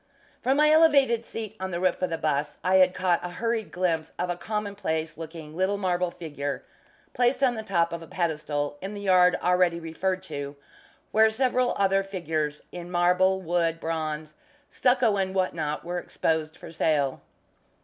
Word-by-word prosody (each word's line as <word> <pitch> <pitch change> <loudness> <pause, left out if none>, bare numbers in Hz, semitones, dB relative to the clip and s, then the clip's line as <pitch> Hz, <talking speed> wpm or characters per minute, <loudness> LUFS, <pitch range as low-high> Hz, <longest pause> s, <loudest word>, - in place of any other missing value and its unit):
From 265 +2 +2
my 300 +1 +5
elevated 280 -7 +5
seat 220 -2 -6
on 190 0 -3
the 170 -2 -3
roof 185 0 +1
of 185 - 0
the 165 - -2
'bus, 150 -1 -1
I 185 +2 +4
had 185 -1 +5
caught 185 -2 +1
a 180 - -3
hurried 225 +3 -2
glimpse 165 -3 -1
of 180 0 -1
a - - -2
commonplace 195 -5 -3
looking 160 -1 -9
little 190 +3 +1
marble 180 -2 0
figure, 145 -4 -5 0.5
placed 250 +2 +2
on 255 -2 +4
the 220 - -4
top 170 -5 0
of 170 - -4
a 165 - -10
pedestal, 150 -4 -2
in 195 +2 -5
the 205 - -6
yard 180 -2 +5
already 180 -1 +3
referred 185 +3 -2
to, 145 -5 -6 0.6
where 220 +1 +5
several 250 +2 +1
other 195 0 +3
figures 160 -6 -3
in 175 0 -8
marble, 180 +2 +3
wood, 165 -1 0
bronze, 155 -2 -3 0.4
stucco 245 -5 +2
and 190 -1 -1
what 185 -1 +1
not, 150 -1 -3
were 175 +1 -2
exposed 160 -1 -2
for - - -10
sale. 150 -4 0
180 Hz, 175 wpm, -26 LUFS, 160-200 Hz, 0.6 s, my